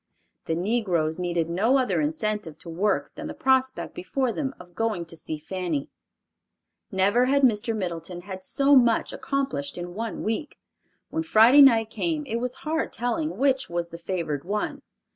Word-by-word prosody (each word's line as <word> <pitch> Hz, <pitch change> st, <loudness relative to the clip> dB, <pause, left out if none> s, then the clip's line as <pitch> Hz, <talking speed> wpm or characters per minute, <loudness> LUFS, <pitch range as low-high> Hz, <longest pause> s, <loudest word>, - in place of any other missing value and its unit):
The 160 Hz, -, -1 dB
negroes 175 Hz, -5 st, 0 dB
needed 175 Hz, -2 st, 0 dB
no 210 Hz, +10 st, +2 dB
other 260 Hz, +3 st, +1 dB
incentive 215 Hz, -, -2 dB
to 170 Hz, -, -11 dB
work 190 Hz, +6 st, 0 dB
than -, -, -7 dB
the -, -, -7 dB
prospect 260 Hz, 0 st, +1 dB
before 255 Hz, +7 st, -1 dB
them 270 Hz, +3 st, -3 dB
of 180 Hz, 0 st, -14 dB
going 220 Hz, -6 st, -1 dB
to 165 Hz, -, -8 dB
see 160 Hz, -1 st, -5 dB
Fanny. 165 Hz, -2 st, -3 dB, 1.0 s
Never 200 Hz, +6 st, +3 dB
had 280 Hz, +2 st, +2 dB
Mr. 225 Hz, -2 st, +2 dB
Middleton 175 Hz, -2 st, -4 dB
had 190 Hz, 0 st, -8 dB
so 280 Hz, +8 st, +3 dB
much 235 Hz, -3 st, +3 dB
accomplished 265 Hz, -, -2 dB
in 175 Hz, 0 st, -6 dB
one 225 Hz, +3 st, -4 dB
week. 225 Hz, +8 st, -3 dB, 0.5 s
When 320 Hz, -, -1 dB
Friday 265 Hz, -3 st, +7 dB
night 225 Hz, -5 st, +6 dB
came, 315 Hz, 0 st, -2 dB
it 230 Hz, -4 st, -2 dB
was 250 Hz, +1 st, -3 dB
hard 320 Hz, +1 st, -1 dB
telling 305 Hz, +7 st, -2 dB
which 265 Hz, 0 st, +2 dB
was 170 Hz, 0 st, -2 dB
the 170 Hz, -, -9 dB
favored 165 Hz, -5 st, -3 dB
one. 210 Hz, +3 st, -3 dB
215 Hz, 165 wpm, -25 LUFS, 175-260 Hz, 1.0 s, Friday